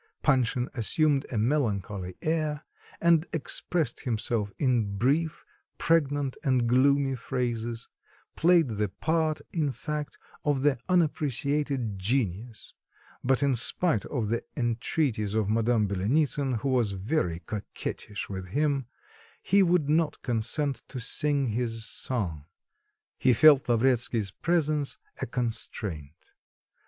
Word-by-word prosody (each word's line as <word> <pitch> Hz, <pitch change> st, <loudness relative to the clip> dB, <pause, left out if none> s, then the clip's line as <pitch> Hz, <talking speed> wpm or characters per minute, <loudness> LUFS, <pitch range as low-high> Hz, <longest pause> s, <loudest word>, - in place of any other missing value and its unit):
Panshin 125 Hz, -3 st, +2 dB
assumed 140 Hz, +4 st, +1 dB
a 120 Hz, -, -2 dB
melancholy 105 Hz, -7 st, -1 dB
air, 155 Hz, -1 st, -1 dB, 0.4 s
and 170 Hz, -1 st, +4 dB
expressed 165 Hz, +1 st, -2 dB
himself 115 Hz, -4 st, -1 dB
in 115 Hz, -7 st, +1 dB
brief, 155 Hz, +8 st, 0 dB, 0.3 s
pregnant, 145 Hz, -4 st, +1 dB
and 130 Hz, -5 st, +2 dB
gloomy 135 Hz, +2 st, +3 dB
phrases, 120 Hz, -2 st, -3 dB, 0.5 s
played 170 Hz, -2 st, +4 dB
the 105 Hz, -2 st, -1 dB
part, 155 Hz, -, 0 dB
in 155 Hz, -5 st, 0 dB
fact, 150 Hz, +2 st, -5 dB, 0.3 s
of 145 Hz, -3 st, +1 dB
the 145 Hz, -4 st, +3 dB
unappreciated 145 Hz, -, 0 dB
genius, 110 Hz, 0 st, -2 dB, 0.5 s
but 135 Hz, +2 st, +2 dB
in 140 Hz, -1 st, +3 dB
spite 145 Hz, -, +2 dB
of 115 Hz, -7 st, -2 dB
the 115 Hz, +1 st, -1 dB
entreaties 115 Hz, -2 st, 0 dB
of 105 Hz, -2 st, +1 dB
Madame 115 Hz, -1 st, +2 dB
Byelenitsin, 130 Hz, +5 st, 0 dB
who 140 Hz, -, -1 dB
was 120 Hz, -6 st, +1 dB
very 95 Hz, -, -1 dB
coquettish 105 Hz, +2 st, -6 dB
with 95 Hz, -2 st, -6 dB
him, 140 Hz, +3 st, 0 dB, 0.6 s
he 200 Hz, +2 st, +4 dB
would 175 Hz, -5 st, +3 dB
not 155 Hz, 0 st, +1 dB
consent 135 Hz, +4 st, -1 dB
to 130 Hz, -, -6 dB
sing 140 Hz, +2 st, 0 dB
his 115 Hz, 0 st, -2 dB
song; 90 Hz, -, -3 dB, 0.7 s
he 130 Hz, -, +4 dB
felt 140 Hz, 0 st, +6 dB
Lavretsky's 120 Hz, -3 st, +2 dB
presence 155 Hz, -, 0 dB, 0.2 s
a -, -, -2 dB
constraint. 100 Hz, -, -4 dB
130 Hz, 115 wpm, -28 LUFS, 110-150 Hz, 0.7 s, felt